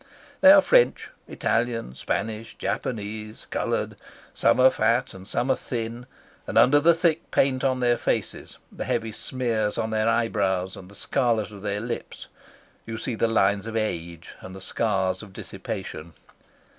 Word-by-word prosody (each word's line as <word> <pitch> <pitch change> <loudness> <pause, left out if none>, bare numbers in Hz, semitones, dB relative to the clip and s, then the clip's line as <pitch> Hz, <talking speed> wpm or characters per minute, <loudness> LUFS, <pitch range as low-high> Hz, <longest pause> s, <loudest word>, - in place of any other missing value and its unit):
They 285 - +9
are 295 0 +9
French. - - +3 0.2
Italian, 115 - -1
Spanish, 110 - -3
Japanese, 105 +1 -4
coloured; - - -1 0.4
some - - +3
are 130 +1 +7
fat 120 +3 +1
and 95 0 -11
some 125 +4 0
are - - +3
thin; 120 0 -5 0.4
and - - -2
under 145 +3 +6
the 165 +3 +5
thick 165 -1 0
paint 130 -1 +2
on 130 -1 +1
their 120 -1 +2
faces, - - -2
the - - -5
heavy 115 -1 -1
smears 110 -2 -1
on 110 0 -1
their 110 +1 +1
eyebrows, 95 -5 0
and 90 -1 -11
the 100 - -14
scarlet 115 -1 0
of 100 -2 -11
their 100 0 -2
lips, 115 +1 -6 0.6
you 115 0 -4
see 115 - -3
the 115 +1 +1
lines 100 -1 +2
of 115 - -5
age 85 -6 -3
and 95 0 -9
the - - -8
scars 95 -2 -1
of 105 -3 -12
dissipation. 85 -2 -7
110 Hz, 160 wpm, -25 LUFS, 100-125 Hz, 0.6 s, They